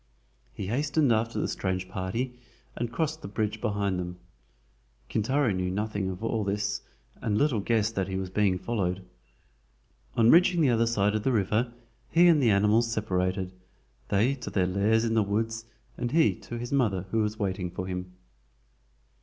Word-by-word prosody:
He 100 - -6
hastened 140 +4 +2
after 115 +1 0
the - - 0
strange 95 -1 -2
party 115 +7 -3 0.4
and 120 0 -3
crossed 155 +5 -2
the - - -6
bridge 105 +1 -2
behind 100 -4 0
them. 90 0 -5 0.9
Kintaro 130 +3 +1
knew 90 -1 -1
nothing 100 0 -2
of 95 +3 -6
all 115 -1 0
this, 100 0 -1 0.4
and 105 -2 0
little 140 -5 +2
guessed 110 +1 +1
that 95 -3 -1
he 95 - -4
was 95 -1 -4
being 100 -2 +2
followed. 95 -3 -2 1.1
On 115 0 +5
reaching 175 0 +5
the 140 -5 +4
other 115 0 +2
side 105 -3 +2
of 110 - 0
the 130 - +1
river 110 +2 +1 0.4
he 175 +1 +5
and 160 -4 +5
the 120 - +4
animals 105 +3 +3
separated, 95 -3 -1 0.5
they 110 +7 +2
to 125 -3 -6
their 95 -2 +1
lairs 105 +5 +2
in 115 - 0
the 110 - +4
woods 115 +3 -1 0.3
and 120 0 -1
he 160 +2 +4
to 120 - -8
his 120 +1 -5
mother, 105 -10 +1
who 115 - +1
was 105 0 -1
waiting 95 -4 -2
for 90 +1 -5
him. 90 0 -5
105 Hz, 175 wpm, -28 LUFS, 95-120 Hz, 1.1 s, On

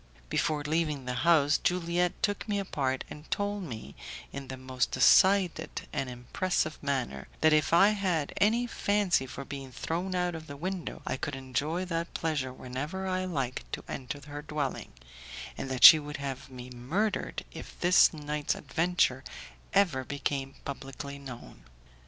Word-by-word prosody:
Before 150 -2 0
leaving 150 -3 -1
the 125 - -2
house, 145 +2 +4
Juliette 175 0 0
took 205 +2 0
me 205 - +1
apart, 135 -9 -1
and 150 +1 -10
told 205 0 -1
me, 110 - -7 0.4
in 140 -1 -6
the 130 - -6
most 130 -1 -1
decided 190 -3 +4
and 135 - -2
impressive 155 +6 -2
manner, 130 - -2
that 155 0 +5
if 155 -1 +3
I 185 +5 +7
had 185 -8 0
any 230 +4 +3
fancy 200 - +1
for 135 +2 -7
being 135 -1 -7
thrown 175 +9 -3
out 180 -1 0
of 160 -1 -7
the 140 - -8
window, 185 +3 -4
I - - -2
could 145 +1 -4
enjoy 140 +7 -2
that 170 -1 -3
pleasure 150 -5 -1
whenever 135 +9 -5
I 185 0 -1
liked 135 -8 -3
to - - -3
enter 130 +1 -5
her 145 0 -6
dwelling, 150 -3 -3 0.6
and 135 - -5
that 130 -1 -2
she 160 - +13
would 150 0 -6
have 135 -2 -5
me 125 -1 -9
murdered 160 - -2
if - - -10
this 180 0 +6
night's 150 -1 -2
adventure 165 -6 +1 0.5
ever 175 -10 +3
became 140 0 -3
publicly 140 +1 -6
known. 130 -4 -10
150 Hz, 160 wpm, -30 LUFS, 135-180 Hz, 0.6 s, she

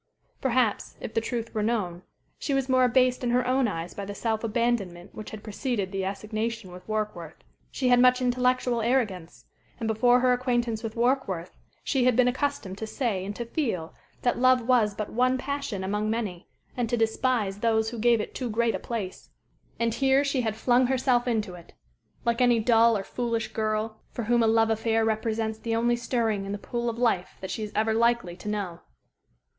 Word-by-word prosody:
Perhaps, 250 -4 +1
if - - -6
the 225 - +1
truth 230 0 -4
were 215 - -1
known, 205 -6 -1 0.4
she 280 - -1
was 270 -1 0
more 255 -1 +4
abased 255 +1 +3
in 245 - 0
her 250 +1 +2
own 255 0 +2
eyes 170 -4 -4
by 200 - -6
the 200 +1 -6
self 220 +1 -1
abandonment 210 -6 -1
which 215 - -8
had 215 -1 -9
preceded 210 -2 -2
the 195 -1 -2
assignation 215 +1 -3
with 180 0 -10
Warkworth. 210 -7 -4 0.3
She 255 -2 0
had 245 0 +6
much 250 0 +5
intellectual 250 -1 +1
arrogance, 215 -8 -1 0.3
and 230 - -3
before 245 +3 +4
her 250 0 +4
acquaintance 240 -3 0
with 225 -2 -5
Warkworth 235 -8 0 0.3
she 265 -4 +1
had 250 -2 +4
been 250 0 +4
accustomed 250 -7 -2
to 220 - -4
say 215 -6 -1
and 200 +2 -5
to 235 - -4
feel 225 - -2 0.3
that 245 - +1
love 255 0 +5
was 225 -5 +3
but 215 0 -4
one 255 +2 +2
passion 280 -7 -3
among 210 +2 -1
many, 210 -6 -3 0.3
and 245 -3 -1
to 240 - +1
despise 225 -3 0
those 220 0 +1
who 235 - -6
gave 235 0 +4
it - - -4
too 250 -2 -3
great 230 +1 +1
a - - -2
place. 210 -6 -5 0.5
And 230 -1 +1
here 270 +3 +3
she 280 -2 0
had 220 -3 -1
flung 245 +2 +3
herself 255 -1 +2
into 215 -5 -1
it, 175 -1 -13 0.5
like 235 +1 +1
any 245 -2 +4
dull 230 0 +4
or 195 - -4
foolish 230 0 -2
girl 215 0 -1
for 240 - -5
whom 235 +2 +2
a 225 - +4
love 225 0 +3
affair 225 0 +1
represents 220 0 -1
the 225 0 -2
only 240 +1 +2
stirring 230 -4 -1
in 200 - -4
the - - -2
pool 235 +3 -3
of 230 - -5
life 225 -7 0
that 190 - -6
she - - -4
is 210 -1 -4
ever 220 +1 +2
likely 235 -5 +1
to 210 - -6
know. 195 -5 -3
230 Hz, 200 wpm, -27 LUFS, 210-245 Hz, 0.5 s, had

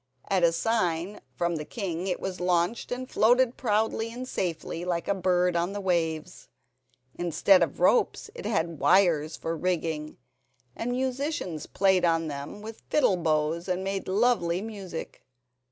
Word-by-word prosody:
At 190 -2 +3
a 170 - +6
sign 180 0 -1
from 170 -1 0
the 150 - -4
king 185 -1 -4
it 180 - -1
was 185 -1 -4
launched, 180 +4 0
and 255 +1 -3
floated 245 +1 +3
proudly 220 0 0
and 250 +2 -6
safely 170 -4 -3
like 175 -2 -2
a - - +2
bird 180 -1 +1
on 170 +3 0
the 205 - -3
waves. 170 -3 -2 0.7
Instead 175 +2 +4
of 165 -5 0
ropes 180 +7 +2
it 485 - -6
had 165 -6 -1
wires 155 0 +3
for 165 0 -3
rigging, 160 -3 -2 0.6
and 245 +2 -2
musicians 260 - -2
played 190 -2 +2
on 165 -2 +2
them 145 +8 -7
with 220 +1 -9
fiddle 255 -11 +3
bows 160 +1 0
and 185 0 -1
made 195 0 -3
lovely 190 -4 +2
music. 195 -5 -7
180 Hz, 155 wpm, -27 LUFS, 165-210 Hz, 0.7 s, a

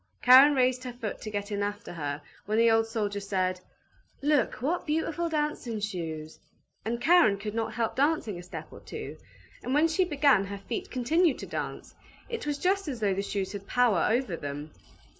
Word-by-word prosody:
Karen 265 +4 +8
raised 255 -1 +2
her 250 - -5
foot 230 -3 -5
to 215 - -5
get 205 0 -4
in 205 0 -1
after 205 -2 -4
her, 145 -2 -4 0.2
when 215 +1 0
the 230 0 +5
old 225 0 +3
soldier 210 -3 -2
said, 185 -2 -1 0.6
"Look, 290 -4 +2
what 330 +7 -2
beautiful 325 +2 -1
dancing 295 -7 -2
shoes!" 165 -6 -5 0.4
And 235 +2 -2
Karen 320 - +5
could 210 +1 -5
not 225 -1 -2
help 230 0 -1
dancing 275 - +1
a - - -7
step 180 - -8
or - - -10
two, - - -8 0.4
and 255 - -2
when 310 +2 +5
she 330 +4 +2
began 285 - +3
her 200 0 -6
feet 220 +4 -5
continued 305 +6 +2
to - - -7
dance; - - -5 0.4
it 465 -10 -4
was 290 -1 -1
just 385 +3 +1
as 260 -5 -4
though 205 -3 +1
the 195 - -1
shoes 200 -1 -3
had 200 -1 -7
power 240 -8 +3
over 230 -5 0
them. 145 0 -6
225 Hz, 195 wpm, -28 LUFS, 200-290 Hz, 0.6 s, Karen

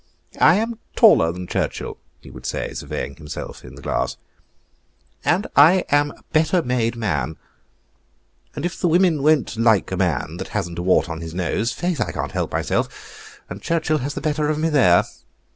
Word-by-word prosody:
"I 160 - +6
am 225 +2 -2 0.2
taller 205 - +6
than 90 +1 -7
Churchill," 85 - -3 0.2
he - - -13
would - - -8
say, - - -3
surveying 70 - -5
himself 75 -2 -8
in 65 0 -11
the 70 - -13
glass, - - -1 1.1
"and 185 +5 +2
I 165 +6 +6
am 145 0 +3
a - - -15
better 160 +2 +3
made 120 -2 0
man; 80 - -2 1.2
and 145 - -3
if 175 - -4
the 180 - +3
women 170 -3 +3
won't 145 -5 +2
like 110 -4 +3
a 95 - -2
man 85 -3 -1
that 95 - -5
hasn't 85 0 -3
a - - -1
wart 90 -1 +3
on 80 -1 -6
his 80 0 -7
nose, 95 +6 -1
faith, 175 +7 -2
I - - -1
can't - - -4
help - - -2
myself, - - -4
and 95 +3 -8
Churchill 160 0 0
has 140 +2 -4
the - - -4
better 150 -1 0
of 155 - 0
me 160 +1 0
there." 115 - +5
125 Hz, 185 wpm, -21 LUFS, -, 1.2 s, I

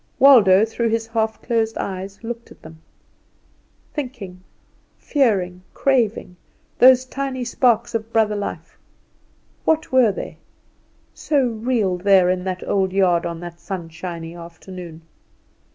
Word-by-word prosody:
Waldo 220 -7 +7
through 230 +1 -2
his 225 0 -1
half 220 -1 -2
closed 225 -2 0
eyes 195 +2 -6
looked 235 0 -6
at - - -17
them. 160 0 -13 1.1
Thinking, 240 - -6 0.6
fearing, 195 - 0
craving, 230 -9 0 0.4
those 255 0 +7
tiny 265 -1 -4
sparks 240 -1 +1
of 225 0 -3
brother 220 -2 +2
life, 205 - -6 0.8
what 320 0 0
were 255 -4 +5
they, - - -7 0.7
so 285 -4 0
real 220 -5 -1
there 185 -1 +4
in 180 0 -2
that 185 -1 -4
old 190 -2 +1
yard 180 -3 +2
on 170 -1 -6
that 175 -1 -9
sunshiny 170 -2 -7
afternoon? 170 0 -10
210 Hz, 120 wpm, -21 LUFS, 180-240 Hz, 1.1 s, Waldo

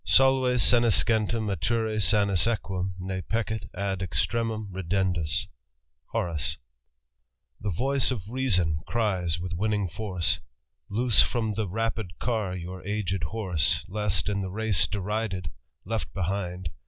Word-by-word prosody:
Solve 130 -1 +5
senescentem 110 - +3
mature 110 +2 0
sanus 100 +1 +3
eguum, 95 -5 -1
ne 95 0 -3
Peccet 110 -3 -2
ad 95 0 -2
extremum 110 +2 -1
ridendus*^ 90 -3 0 0.6
HOR« 85 - -1 1.3
''The 105 - -1
voice 135 +9 +2
of 105 -8 -3
reason 90 -12 +1
cries 95 -8 0
with 90 0 -4
winning 105 +2 0
force. 90 -1 0 0.5
Loose 115 +2 +4
from 110 -3 +1
the 110 0 -1
rapid 110 -3 -2
car 110 -6 -1
your 90 +1 -6
aged 95 -4 -1
horse, 90 -4 +1
Lest, 100 -4 0
in 100 -1 0
the 95 - -3
race 110 0 +2
derided, 100 -4 -2 0.3
left 110 +3 -2
behind. 90 -2 -2
100 Hz, 120 wpm, -27 LUFS, 90-110 Hz, 1.3 s, Solve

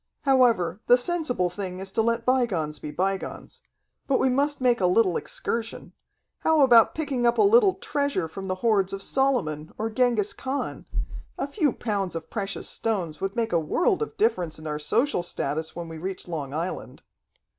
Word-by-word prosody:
However, 235 - +3
the 245 - +7
sensible 250 - -1
thing 185 -1 -5
is 190 +1 -6
to 225 - +1
let 230 +1 0
bygones 190 - 0
be 150 - -6
bygones. 190 +4 -3 0.5
But 270 - +3
we 260 - +2
must 285 +3 +1
make 245 -4 +2
a 180 - +4
little 180 -1 +3
excursion. 230 0 -4 0.5
How 320 -2 +3
about 235 -4 +6
picking 275 -6 0
up 235 - +2
a - - +5
little 410 -2 +5
treasure 285 - -1
from 190 +4 -7
the 185 - -1
hoards 200 -4 +2
of 195 0 -3
Solomon 185 - 0
or 225 +1 -2
Genghis 230 -3 +1
Khan? 270 +2 -4 0.5
A - - -1
few 295 -1 +1
pounds 200 -7 -3
of 165 -1 -6
precious 195 -2 -3
stones 180 -9 -1
would 195 +2 -2
make 230 -5 -1
a 170 - +4
world 355 - +1
of 445 - -4
difference 185 -8 +1
in 155 - -11
our 150 -1 -3
social 205 - +1
status 160 -2 -3
when 170 -1 -6
we 160 -1 -8
reach 185 +2 -5
Long 150 -6 -4
Island." 165 +5 -5
215 Hz, 180 wpm, -25 LUFS, 175-255 Hz, 0.5 s, the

